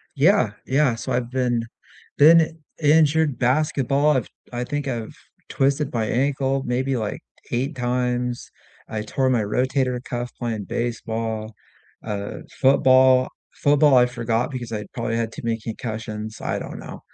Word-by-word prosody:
Yeah, 145 - +4
yeah, 135 -3 +2
so 120 +3 -5
I've 120 -1 -1
been 125 -2 0 0.5
been 160 +1 +5 0.2
injured 155 -2 +4
basketball, 140 +2 +2
I've 120 - -2 0.2
I 120 0 -3
think 145 +2 -3
I've 115 -4 -4 0.4
twisted 140 +1 0
my 115 -2 0
ankle 135 +3 0
maybe, 130 +2 0
like, 110 -3 -3 0.3
8, 135 +5 -1
times. 125 -1 -1 0.4
I 110 -1 -3
tore 130 +2 0
my 120 -3 +2
rotator 125 +3 0
cuff 120 -1 -4
playing 110 -5 -3
baseball, 115 -2 -3 0.5
uh, 100 -2 -4 0.2
football. 130 -1 +5 0.3
Football, 145 -1 +4
I 125 - +6
forgot 120 +1 -1
because 120 -3 -6
I 105 -2 -4
probably 115 -1 -2
had 115 -1 -2
too - - -8
many 115 -1 -1
concussions, 110 -1 -6
I - - -2
don't - - -7
know, - - -9
125 Hz, 145 wpm, -23 LUFS, 115-135 Hz, 0.5 s, I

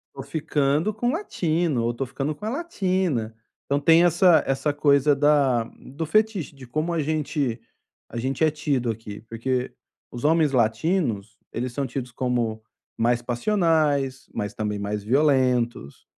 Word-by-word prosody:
eu - - -6
tô - - -8
ficando 150 +4 0
com 230 +4 -2
o - - +2
latino 170 - -1
ou 115 - +1
tô 135 +3 -3
ficando 135 +4 -3
com 210 - -9
a - - -1
latina." 185 - -1 0.3
Então, 140 +1 +1
tem 165 +3 +5
essa 175 0 +5
essa 135 +2 0
coisa 145 0 +3
da 140 -4 +3 0.2
do 145 +5 -6
fetiche. 210 -3 0
De 135 -2 -12
como 155 +7 -2
a 165 - 0
gente 145 -5 -1 0.5
a 120 - -8
gente 130 +4 -1
é 155 - +4
tido 140 -6 -1
aqui. 105 -2 -8
Porque 125 +3 -3 0.4
os 120 - -8
homens 155 -1 +3
latinos 115 - 0
eles 125 +1 -4
são 140 +1 -2
tidos 125 0 -5
como 120 -3 -1 0.3
mais 120 +1 +2
passionais, 145 - +1
mas 105 -1 -3
também 105 -1 -3
mais 100 0 -3
violentos. 125 - +1
140 Hz, 160 wpm, -24 LUFS, 120-160 Hz, 0.5 s, tem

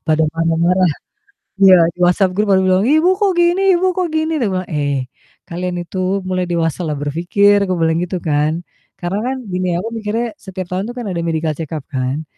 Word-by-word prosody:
Pada 155 0 +3
marah-marah. 165 +2 +2 0.7
Iya 190 -1 +8 0.2
di - - -36
WhatsApp 180 +2 +3
group 210 0 +1
pada 190 - +5
bilang, 185 +1 +3
"Ibu 310 +8 +3
kok 400 0 +1
gini 345 +2 +3 0.2
Ibu 375 - 0
kok 365 -1 0
gini." 315 0 0
tuh 230 - +1
bilang, 185 -1 -3
"Eh 145 -4 -2 0.4
kalian 180 +1 -4
itu 185 +2 -1
mulai 185 -1 -1
dewasalah 165 -1 -1
berpikir," 180 +7 +2
gue 185 -2 -1
bilang 160 0 +2
gitu 180 +1 -3
kan. 155 0 0 0.4
Karena 175 +3 -2
kan 265 - -2 0.2
gini 185 0 -1
ya, - - 0
aku 220 +5 -4
mikirnya 225 +2 -2
setiap 190 -2 -7
tahun 185 +1 -1
tuh - - -12
kan 240 - -5
ada 180 -3 -3
medical 160 -1 -1
check 160 -2 -7
up 150 - -5
kan 130 +3 -2
180 Hz, 200 wpm, -17 LUFS, 165-200 Hz, 0.7 s, Iya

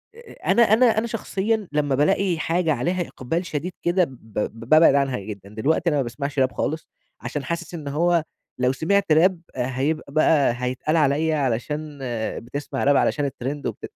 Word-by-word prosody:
أ 470 0 -14 0.2
أنا 235 - +4
أنا 225 +3 +5
أنا 230 +2 +1
شخصيًا 220 -1 -2
لمّا 145 -2 +1
بالاقي 170 +5 +2
حاجة 165 0 +1
عليها 175 +2 -1
إقبال 165 +8 -3
شديد 170 +2 -3
كده 175 +2 +3
ب 165 - -2 0.3
ب 115 +2 -5
بابعد 155 -2 +7
عنها 135 -4 +1
جدًا، 100 -1 -8
دلوقتي 145 +10 0
أنا 150 - +1
ما 140 - +1
باسمعش 140 +4 -4
راب 130 0 +3
خالص 155 +2 -3 0.3
عشان 145 -2 -4
حاسس 170 +4 -4
إن 155 -4 -6
هو 170 +3 +2 0.4
لو 125 0 +3
سمعت 190 +6 +1
راب 170 +3 +4
هيبقى 135 +4 -2
بقى 150 -4 +4
هيتقال 130 +6 -1
عليَّ 155 +2 +2
علشان 145 +2 -2 0.4
بتسمع 140 +2 -4
راب 140 0 +4
علشان 145 - +1
الترند، 140 +2 -4
وبت - - -6
150 Hz, 170 wpm, -23 LUFS, 135-170 Hz, 0.4 s, بابعد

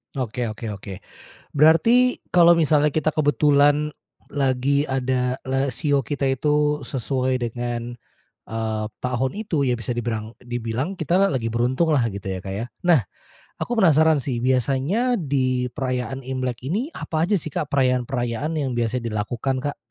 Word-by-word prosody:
Oke 125 -2 -2
oke 110 0 -5
oke. 100 -1 -7 0.6
Berarti 230 - +5
kalau 170 -1 +6
misalnya 150 -3 +3
kita 155 0 +1
kebetulan 145 0 +3 0.4
lagi 140 +1 +1
ada 130 -2 0 0.2
la 135 -1 0
shio 140 -3 0
kita 140 -2 -1
itu 150 +1 +1
sesuai 130 0 -1
dengan, 120 0 -4 0.5
eee, 110 -1 -2 0.2
tahun 125 +1 -1
itu, 180 -10 -1
ya 125 - +2
bisa 115 0 -4
dibirang 110 -1 -3
dibilang 120 +7 -3
kita 175 0 0
lagi 125 -9 -1
beruntunglah 130 +4 +1
gitu, 100 -1 -6
ya 95 -1 -3
Kak 95 +1 -6
ya. 110 +4 -3 0.2
Nah, 165 -8 +5 0.6
aku 240 -1 -2
penasaran 160 -5 +5
sih, 125 -3 -3
biasanya 135 - +1
di 130 - 0
perayaan 130 -1 -3
Imlek 130 -2 -3
ini, 220 - -1
apa 155 -1 -3
aja 200 +3 +2
sih 155 -3 -7
Kak 150 - -2
perayaan-perayaan 125 +2 0
yang 135 -4 -1
biasanya 115 -1 -2
dilakukan, 120 +5 -2
Kak? 145 0 -3
130 Hz, 145 wpm, -23 LUFS, 120-150 Hz, 0.6 s, kalau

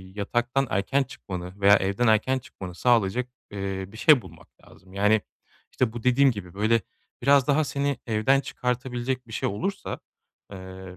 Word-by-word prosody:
yataktan 120 +6 0
erken 135 +9 +1
çıkmanı 95 -6 -8
veya 100 +1 +7
evden 100 +5 0
erken 110 +5 +3
çıkmanı 95 -7 -10
sağlayacak, 120 +2 +2 0.2
eee, 95 -1 -4
bir 105 - -13
şey 145 +2 +6
bulmak - - -15 0.2
lazım. 95 0 -18
Yani, 105 +2 +3 0.5
işte, 120 -3 0
bu 120 - -7
dediğim 130 +2 +4
gibi 90 -5 -8
böyle 110 +2 +2 0.4
biraz 140 0 +4
daha 150 +2 +3
seni 140 -1 -1
evden 110 +5 +3
çıkartabilecek 125 0 -3
bir 115 - -13
şey - - -1
olursa, 150 - -4 0.5
eee, 100 - -7
b 95 0 -10
115 Hz, 160 wpm, -25 LUFS, 100-130 Hz, 0.5 s, veya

